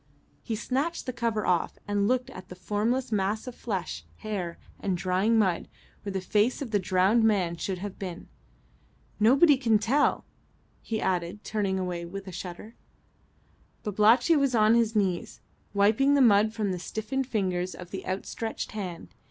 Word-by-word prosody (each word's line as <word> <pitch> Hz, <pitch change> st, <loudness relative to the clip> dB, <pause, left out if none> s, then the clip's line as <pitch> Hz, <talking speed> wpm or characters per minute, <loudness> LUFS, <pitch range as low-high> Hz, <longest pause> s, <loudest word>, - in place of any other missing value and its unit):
He 225 Hz, -, -3 dB
snatched 275 Hz, +9 st, -2 dB
the 255 Hz, -, -3 dB
cover 230 Hz, -3 st, -1 dB
off 175 Hz, -2 st, +1 dB
and 205 Hz, 0 st, +1 dB
looked 255 Hz, +1 st, 0 dB
at 185 Hz, -6 st, -11 dB
the 180 Hz, -, -8 dB
formless 215 Hz, +7 st, -1 dB
mass 205 Hz, +1 st, 0 dB
of 250 Hz, -, -6 dB
flesh, 185 Hz, -, -4 dB
hair, 185 Hz, -, -4 dB, 0.2 s
and 190 Hz, -3 st, -1 dB
drying 190 Hz, +5 st, +2 dB
mud, 190 Hz, -6 st, +1 dB, 0.3 s
where 200 Hz, -, -5 dB
the 190 Hz, -, -2 dB
face 210 Hz, +6 st, +1 dB
of 265 Hz, -6 st, -5 dB
the 205 Hz, -, +2 dB
drowned 190 Hz, +5 st, +3 dB
man 190 Hz, -6 st, +2 dB
should 185 Hz, +3 st, -3 dB
have 195 Hz, +1 st, -7 dB
been. 180 Hz, -3 st, -6 dB, 0.9 s
"Nobody 270 Hz, +7 st, +6 dB
can 230 Hz, -4 st, +3 dB
tell," 260 Hz, +8 st, +1 dB, 0.6 s
he 220 Hz, -1 st, -3 dB
added, 180 Hz, +2 st, -2 dB
turning 200 Hz, -3 st, -1 dB
away 180 Hz, -2 st, -3 dB
with 195 Hz, +3 st, -8 dB
a -, -, -6 dB
shudder. 180 Hz, +5 st, -8 dB, 1.1 s
Babalatchi 220 Hz, -, +4 dB
was 275 Hz, -4 st, +2 dB
on 215 Hz, 0 st, +5 dB
his 230 Hz, -1 st, +2 dB
knees 190 Hz, -4 st, -1 dB, 0.3 s
wiping 220 Hz, +8 st, +3 dB
the 280 Hz, -, +4 dB
mud 215 Hz, -3 st, +5 dB
from 215 Hz, -3 st, -2 dB
the 180 Hz, -, -3 dB
stiffened 220 Hz, +8 st, -3 dB
fingers 185 Hz, -6 st, -1 dB
of 180 Hz, -1 st, -10 dB
the 195 Hz, -, -5 dB
outstretched 200 Hz, +4 st, -4 dB
hand. 185 Hz, -6 st, -6 dB
210 Hz, 165 wpm, -27 LUFS, 185-230 Hz, 1.1 s, Nobody